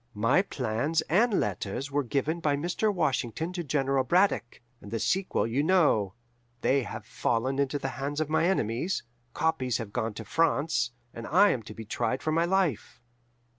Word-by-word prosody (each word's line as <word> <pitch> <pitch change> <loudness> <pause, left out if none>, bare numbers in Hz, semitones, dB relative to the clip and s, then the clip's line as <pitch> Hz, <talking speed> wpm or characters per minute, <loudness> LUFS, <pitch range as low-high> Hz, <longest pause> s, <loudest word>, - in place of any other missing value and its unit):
"My 115 - +3
plans 140 - -1
and 210 +5 +2
letters 105 +7 -3
were 145 +1 +1
given 145 +6 -1
by 150 -3 +1
Mr. 175 +8 0
Washington 160 - -1
to 175 -1 -3
General 135 -2 +1
Braddock, 180 -5 +1 0.2
and 100 - -10
the 115 - -2
sequel 190 - 0
you 115 +5 0
know: 145 - +3 0.5
they 140 +1 +3
have - - -7
fallen 130 +4 -1
into 140 +1 +1
the 135 -1 -3
hands 145 +2 -2
of 155 - 0
my 160 +2 +2
enemies, 160 - 0 0.3
copies 145 -7 0
have 110 -4 -7
gone 110 -1 -2
to 110 - -7
France, 160 +2 +1 0.2
and 115 - -7
I 195 +7 +5
am 125 - -2
to 105 -1 -11
be 110 - -8
tried 120 +4 -2
for 155 - 0
my 165 +2 +2
life. 180 - 0
140 Hz, 175 wpm, -28 LUFS, 115-165 Hz, 0.5 s, I